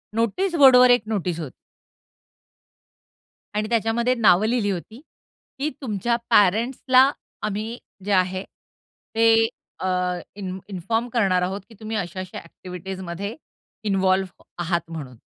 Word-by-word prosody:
Notice 230 - 0
बोर्डवर 255 -4 +8
एक 245 -1 +5
notice 180 -6 -1
होती. 150 -5 -6 2.0
आणि 215 +1 -1
त्याच्यामध्ये 235 +2 +1
नावं 215 -4 +4
लिहिली 220 -4 +1
होती 215 +7 -6 0.6
की 290 +3 0
तुमच्या 235 -1 -1
पॅरेंट्सला 250 +6 +4 0.3
आम्ही 215 +3 -3 0.3
जे 205 - -2
आहे 185 0 +1 0.7
ते 225 0 +5 0.3
अ, 185 - -2 0.5
इन 190 -2 -5
इन्फॉर्म 225 +5 -2
करणार 195 -6 +2
आहोत 190 +3 -2
की 225 - -15
तुम्ही 220 0 -4
अशा-अशा 185 0 -5
अ‍ॅक्टिव्हिटीजमध्ये 185 +3 -7 0.5
इन्व्हॉल्व 190 -2 +1 0.2
आहात 170 0 0
म्हणून. 140 -6 -7
205 Hz, 115 wpm, -23 LUFS, 185-230 Hz, 2.0 s, बोर्डवर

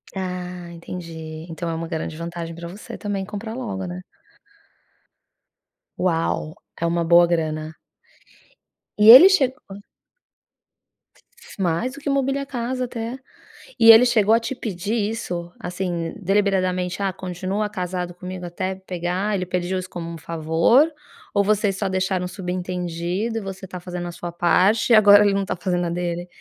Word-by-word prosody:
Ah 180 -2 -5
entendi, 165 -2 -8
então 165 +1 -4
é 165 - -2
um 165 +1 -4
grande 160 -1 -4
vantagem 170 0 -6
pra 170 0 -7
você 195 +5 -9
também 200 -2 -3
comprar 210 +2 -6
logo, 205 -7 -4
né. 180 +1 -6 2.0
Uau, 165 -3 -1 0.2
é 170 - -1
uma 170 0 +1
boa 175 +1 +6
grana. 155 -2 -2 1.2
E 210 +1 +6
ele 275 +11 +12
chegou. 260 - 0 1.8
Mais 190 +9 0
do 285 - -10
que 285 - -9
mobíliar 275 0 0
casa 255 -1 -3
até. 235 +1 -5 0.6
E 225 - +7
ele 225 +2 +8
chegou 220 -3 +3
a - - +3
te 230 +3 -4
pedir 210 -4 -4 0.2
isso, 175 -6 -5
assim 175 -2 -3
deliberadamente: 185 -1 0
"Ah, 195 - +1
continua 185 +3 -3
casado 180 -3 -4
comigo 180 0 -7
até 185 +2 -3
pegar", 185 +2 -3
ele 185 -2 0
pediu 180 +1 -1
isso 185 - -7
como 170 -2 -6
um 170 - -6
favor, 165 - +3 0.5
ou 200 -1 +3
vocês 205 -1 +1
só 195 0 -2
deixaram 185 -1 -1
subentendido, 180 +3 -3
e - - -8
você 195 -1 -7
tá 180 0 -7
fazendo 175 0 -6
a - - -5
sua 175 0 -7
parte, 185 +7 +2
e - - +9
agora 205 -1 +8
ele 205 - +3
não 200 - +1
está 195 - -3
fazendo 180 -1 -1
a - - -2
dele? 175 0 -3
185 Hz, 155 wpm, -22 LUFS, 175-205 Hz, 2.0 s, ele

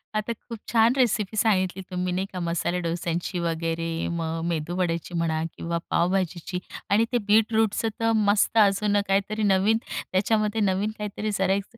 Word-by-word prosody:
आता 215 +2 -1
खूप 230 +1 -10
छान 230 +1 +4
रेसिपी 220 -5 +1
सांगितली 190 -3 +2
तुम्ही 180 0 -1
नाही 185 +2 -1
का, 185 - -4
मसाले 170 +1 -1
डोश्यांची 170 +1 -2
वगैरे, 165 0 -2
मग 165 -1 -2
मेदूवड्याची 170 +1 -2
म्हणा 160 -1 0
किंवा 170 0 -2
पावभाजीची 180 0 0 0.3
आणि 215 +3 +4
ते 245 - +2
बीटरूटचं 220 +1 +3
तर 225 0 +2
मस्त 210 +1 +2
अजून 205 0 +4
काहीतरी 200 +3 0
नवीन 205 +2 +3
त्याच्यामध्ये 215 +3 0
नवीन 200 +2 +1
काहीतरी 210 +1 -4
करायचं, 195 +4 0
195 Hz, 145 wpm, -25 LUFS, 170-215 Hz, 0.3 s, छान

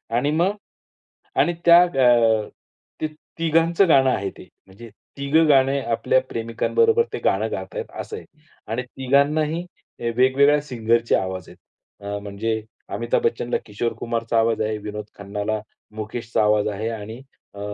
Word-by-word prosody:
आणि 140 +5 +1
मग 175 +6 +1 0.9
आणि 175 - +2
त्या 170 0 +9
अ, 120 -9 +3 0.5
ते 155 - +1 0.3
तिघांचं 165 +3 +3
गाणं 135 -3 +5
आहे 100 -5 -1
ते - - -12 0.2
म्हणजे 105 +5 -13 0.3
तिघं 150 +4 +3
गाणे 135 0 +4
आपल्या 120 +1 +1
प्रेमिकांबरोबर 445 - +1
ते - - -3
गाणं - - +1
गातात 485 -1 -5
असं 440 - -7
आहे. - - -11 0.4
आणि 115 +4 -2
तिघांनाही 145 +6 +1 0.3
अ, - - -9
वेगवेगळ्या 140 +3 +4
सिंगरचे 115 -4 +1
आवाज 95 -2 -3
आहे. - - -14 0.5
अ, 100 0 -3
म्हणजे 105 +2 -3 0.3
अमिताभ 120 0 0
बच्चनला 120 +1 0
किशोर 115 +2 -3
कुमारचा 115 -1 -1
आवाज 115 -1 +1
आहे, 110 0 -1
विनोद 105 0 -6
खन्नाला 105 +2 -3 0.3
मुकेशचा 110 +1 -2
आवाज 105 0 +3
आहे 105 +2 -3
आणि 110 +2 -7 0.3
अ, 100 - -11
120 Hz, 140 wpm, -22 LUFS, 110-145 Hz, 0.9 s, त्या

